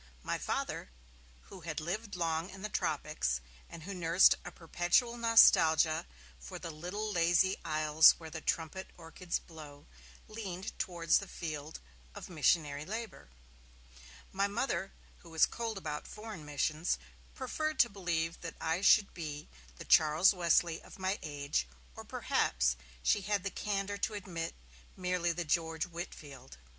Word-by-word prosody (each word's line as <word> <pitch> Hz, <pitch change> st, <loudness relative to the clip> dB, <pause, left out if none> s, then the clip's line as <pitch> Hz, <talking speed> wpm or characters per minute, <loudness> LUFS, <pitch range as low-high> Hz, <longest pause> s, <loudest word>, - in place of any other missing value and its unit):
My -, -, -2 dB
Father, -, -, -3 dB, 0.6 s
who 190 Hz, -, -10 dB
had 160 Hz, -1 st, -4 dB
lived 200 Hz, +6 st, -4 dB
long 165 Hz, 0 st, -1 dB
in 190 Hz, 0 st, -11 dB
the 215 Hz, -, -3 dB
Tropics, 155 Hz, -, -1 dB, 0.3 s
and 165 Hz, -, -10 dB
who 200 Hz, +4 st, -6 dB
nursed 175 Hz, 0 st, +5 dB
a -, -, -7 dB
perpetual 175 Hz, +8 st, +1 dB
nostalgia 165 Hz, -, +5 dB, 0.3 s
for -, -, -8 dB
'the 165 Hz, -, -6 dB
little 180 Hz, +7 st, -4 dB
lazy 175 Hz, +1 st, +3 dB
isles 155 Hz, 0 st, +6 dB
where 160 Hz, -1 st, -10 dB
the 160 Hz, 0 st, -6 dB
trumpet 165 Hz, +5 st, -2 dB
orchids 170 Hz, +1 st, -4 dB
blow', 150 Hz, -3 st, -12 dB, 0.4 s
leaned 195 Hz, -4 st, -6 dB
towards 170 Hz, -2 st, +2 dB
the 200 Hz, -, -8 dB
field 155 Hz, -3 st, -6 dB, 0.4 s
of -, -, -9 dB
missionary 150 Hz, -3 st, +2 dB
labour. 210 Hz, -, -6 dB, 1.0 s
My 200 Hz, +1 st, +1 dB
Mother, 200 Hz, -4 st, -2 dB, 0.3 s
who 170 Hz, -, -15 dB
was 160 Hz, -1 st, +4 dB
cold 230 Hz, -3 st, -4 dB
about 150 Hz, -5 st, -5 dB
foreign 210 Hz, -7 st, -8 dB
missions, 155 Hz, +3 st, 0 dB, 0.4 s
preferred 310 Hz, +3 st, -2 dB
to 240 Hz, -, +4 dB
believe 170 Hz, -5 st, -2 dB
that 165 Hz, -, -6 dB
I 165 Hz, +3 st, -1 dB
should 200 Hz, 0 st, +5 dB
be 150 Hz, -3 st, -6 dB, 0.3 s
the -, -, -10 dB
Charles 155 Hz, +5 st, +5 dB
Wesley 170 Hz, -2 st, +2 dB
of -, -, -13 dB
my 190 Hz, +1 st, -1 dB
age, 145 Hz, -, -2 dB, 0.3 s
'or -, -, -8 dB
perhaps', -, -, +1 dB, 0.3 s
she 205 Hz, -, +3 dB
had 200 Hz, -1 st, -1 dB
the 200 Hz, -, -3 dB
candour 200 Hz, 0 st, -2 dB
to 215 Hz, -, -1 dB
admit, 175 Hz, -5 st, -5 dB, 0.4 s
'merely 180 Hz, -2 st, 0 dB
the 170 Hz, +1 st, -3 dB
George 160 Hz, 0 st, 0 dB
Whitefield'. 150 Hz, -6 st, -9 dB
170 Hz, 145 wpm, -33 LUFS, 155-195 Hz, 1.0 s, isles